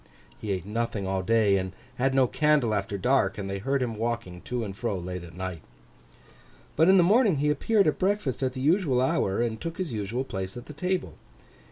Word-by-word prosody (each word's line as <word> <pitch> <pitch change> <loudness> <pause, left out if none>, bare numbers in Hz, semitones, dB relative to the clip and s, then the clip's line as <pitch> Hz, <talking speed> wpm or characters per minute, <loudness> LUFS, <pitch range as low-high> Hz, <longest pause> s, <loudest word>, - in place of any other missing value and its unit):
He 105 - -6
ate 95 -2 -2
nothing 110 -1 -2
all 95 0 -1
day, 105 0 +3
and 95 0 -3 0.3
had 135 +1 +2
no 135 -1 +5
candle 150 -4 +2
after 100 0 -2
dark; 110 -1 +2
and 100 -2 -4
they 100 0 -3
heard 135 +5 0
him 120 -2 -2
walking 115 -5 -3
to 125 -1 -2
and 100 -3 -6
fro 110 -1 -2
late 90 0 -5
at 85 -1 -12
night. 90 -3 -5 1.1
But, 165 +3 +5
in 190 - +7
the 180 - +6
morning 210 0 +4
he 150 +1 +1
appeared 200 +8 +2
at 155 - +1
breakfast 190 - 0
at 130 -1 0
the 130 - -5
usual 150 -3 +2
hour, 120 -4 +1
and 115 -2 -3
took 165 0 -5
his 180 -9 -3
usual 110 +4 -2
place 95 -4 -5
at 120 - -8
the 150 - -9
table. 180 +6 -2
120 Hz, 215 wpm, -27 LUFS, 100-150 Hz, 1.1 s, in